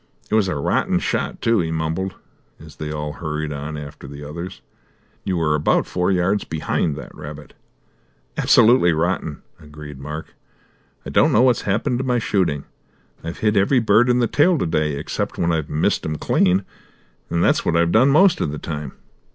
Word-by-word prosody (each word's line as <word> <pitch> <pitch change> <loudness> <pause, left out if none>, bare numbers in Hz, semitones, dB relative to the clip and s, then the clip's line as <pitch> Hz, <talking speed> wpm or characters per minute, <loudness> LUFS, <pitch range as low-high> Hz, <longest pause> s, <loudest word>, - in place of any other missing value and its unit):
"It - - -2
was 110 -3 +3
a 90 - -1
rotten 70 - +1
shot, - - -2
too," 115 -1 +3
he 85 -2 -1
mumbled, 80 +4 -2 0.4
as - - -14
they 75 -1 -5
all 75 -1 -4
hurried 75 -1 -4
on 75 +2 -5
after 70 -1 -9
the 70 +1 -9
others. 85 +5 -7 0.6
"You 95 -2 -1
were 80 -2 +1
about 75 0 +2
four 90 0 -1
yards 95 +3 +1
behind 80 -1 -1
that - - -9
rabbit." 75 0 -10 0.8
"Absolutely 110 -7 +5
rotten," 80 -2 -2 0.2
agreed 75 -2 -11
Mark. 75 +3 -7 0.7
"I - - -6
don't - - +4
know 115 - +4
what's 125 -3 +3
happened 115 +5 0
to - - -1
my 125 -2 +1
shooting. 90 -10 0 0.6
I've 85 +1 -5
hit 105 0 +3
every 100 +7 +3
bird 115 +2 +4
in 125 - +3
the 120 - +3
tail 160 +8 +3
to - - -1
day, 75 -2 0
except 70 - -4
when 85 0 +1
I've 80 -3 -1
missed 75 +1 0
'em 75 - -3
clean, 95 +4 +2 0.6
and 85 - 0
that's - - +3
what - - 0
I've 85 0 +2
done 125 +7 +5
most 175 +6 +4
of - - 0
the 75 - -5
time. 75 -3 -6
85 Hz, 185 wpm, -21 LUFS, 75-105 Hz, 0.8 s, Absolutely